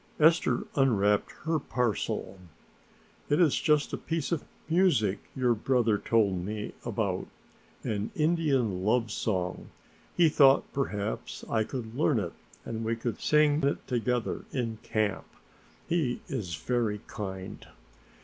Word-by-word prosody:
Esther 165 +3 +4
unwrapped 105 -7 +2
her 160 0 +1
parcel. 115 -6 -2 0.9
"It 145 - +3
is 165 -6 +4
just 150 -2 +2
a - - -2
piece 165 -2 -2
of 170 - 0 0.2
music 160 - +3 0.2
your 125 -2 +3
brother 115 -2 +2
told 100 -6 +2
me 105 +2 -4
about, - - -2 0.6
an 105 0 -2
Indian 140 - +1
love 115 +2 +2
song. 90 -5 -2 0.5
He 175 -2 +6
thought 140 -3 +6
perhaps 105 - -3
I 110 -1 +1
could 115 -1 -6
learn 145 -1 +2
it 85 -5 -3 0.3
and 115 0 -4
we 115 +1 0
could 115 -1 -4
sing 150 0 +4
it 140 0 0
together 125 -1 -1
in 115 -4 -2
camp. 105 -3 -1 0.6
He 155 -8 0
is 90 -6 -3
very 110 0 -1
kind." 95 -3 -7
120 Hz, 130 wpm, -29 LUFS, 105-145 Hz, 0.9 s, He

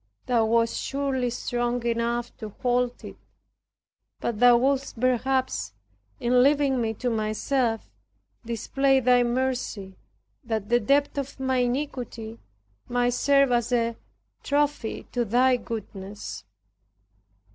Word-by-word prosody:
Thou 235 -3 +2
wast 230 +1 +1
surely 270 -3 -1
strong 240 0 -2
enough 235 +1 -1
to 215 - -6
hold 245 0 0
it, - - -9 1.0
but 230 -3 -3
Thou 245 0 +7
wouldst 270 -1 0
perhaps, 255 +1 0 0.5
in 245 0 +3
leaving 280 -1 +3
me 225 -1 -1
to 245 +2 -2
myself, 225 +2 -1 0.6
display 265 +4 +1
thy 250 -1 +4
mercy 240 -6 -2 0.5
that 220 -4 -3
the 240 +1 +4
depth 280 +5 +1
of 275 0 -6
my 260 -1 0
iniquity 245 -3 -3 0.5
might 245 0 +1
serve 275 +1 +3
as 240 0 +1
a 235 -1 +1 0.5
trophy 290 -5 -1
to 245 - 0
thy 250 +4 +3
goodness. 200 - -7
245 Hz, 115 wpm, -26 LUFS, 230-260 Hz, 1.0 s, Thou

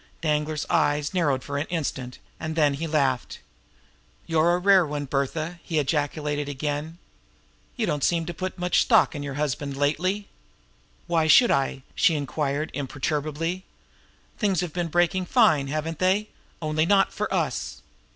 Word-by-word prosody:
Danglar's 150 -1 -1
eyes 150 -2 +1
narrowed 145 -8 +1
for 140 0 -3
an 145 - -3
instant; 135 -7 -3 0.2
and 160 0 -4
then 150 -3 +3
he 160 +4 -3
laughed. 140 -5 0 0.9
"You're 165 +2 +3
a - - +1
rare 190 0 +5
one, 145 -2 -3
Bertha!" 155 +5 -2
he 165 - -3
ejaculated 145 0 -1
again. 145 +3 -3 0.8
"You 235 - 0
don't 145 -7 -1
seem 170 -1 +2
to 175 - -5
put 185 +2 -5
much 180 -1 +2
stock - - +4
in 145 - -5
your 140 -1 -5
husband 145 -1 -2
lately." 185 +8 0 0.8
"Why 165 -2 +1
should 240 +9 +7
I?" 135 -1 0
she 165 - +3
inquired 145 +1 -2
imperturbably. 150 +5 -2 0.8
"Things 195 -6 +1
have 175 -4 -4
been 175 -1 -1
breaking 175 +2 +1
fine, 170 - +4
haven't 155 +2 -3
they? 195 +3 +2 0.3
only 155 +1 +1
not 195 0 +3
for - - -3
us!" - - -2
155 Hz, 150 wpm, -25 LUFS, 145-175 Hz, 0.9 s, should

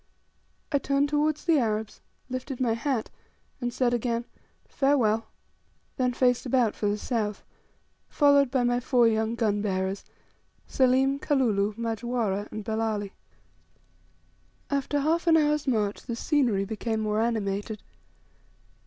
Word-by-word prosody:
I 285 - +2
turned 280 +1 +1
towards 300 +1 0
the 330 -4 +4
Arabs, 220 -2 -2 0.3
lifted 255 +1 -5
my 240 -3 +1
hat, 230 0 -2 0.5
and 245 -2 -2
said 245 -1 +1
again, 235 0 -1 0.4
"Farewell," 235 -6 +1 0.7
then 250 -1 +1
faced 245 0 +2
about 245 -4 +2
for 210 - -1
the 205 - 0
south, 210 -3 -2 0.7
followed 285 -2 +4
by 260 -1 +1
my 245 0 +2
four 245 -1 +3
young 220 +1 0
gun 210 -3 0
bearers, 190 -1 -2 0.6
Selim, 265 +1 +2
Kalulu, 215 -9 +1
Majwara, 225 -3 -2
and 215 -1 -6
Belali. 220 -2 -2 1.6
After 280 +1 0
half 330 +4 0
an 325 -1 +6
hour's 300 -1 +1
march 210 -5 0
the 235 - -5
scenery 235 -8 +1
became 220 +1 -3
more 215 0 0
animated. 210 -2 -2
240 Hz, 125 wpm, -27 LUFS, 215-270 Hz, 1.6 s, an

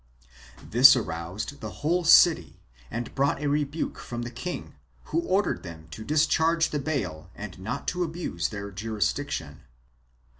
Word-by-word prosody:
This 125 +5 +8
aroused 105 - -4
the - - -5 0.2
whole 175 +3 +2
city 165 - +5 0.3
and 120 0 -5
brought 140 +1 +1
a 150 - -4
rebuke 145 +2 -1
from 120 0 -5
the 120 - -6
king, 125 +9 -6 0.3
who - - -1
ordered 205 - 0
them 80 -3 -10
to 110 - -7
discharge 160 +4 +2
the 150 - -1
bail 130 - -3
and 100 -3 -8
not 115 +8 -5
to 180 +1 -1
abuse 160 - -3
their 100 -1 -6
jurisdiction. 105 - -3
125 Hz, 145 wpm, -27 LUFS, 100-155 Hz, 0.3 s, This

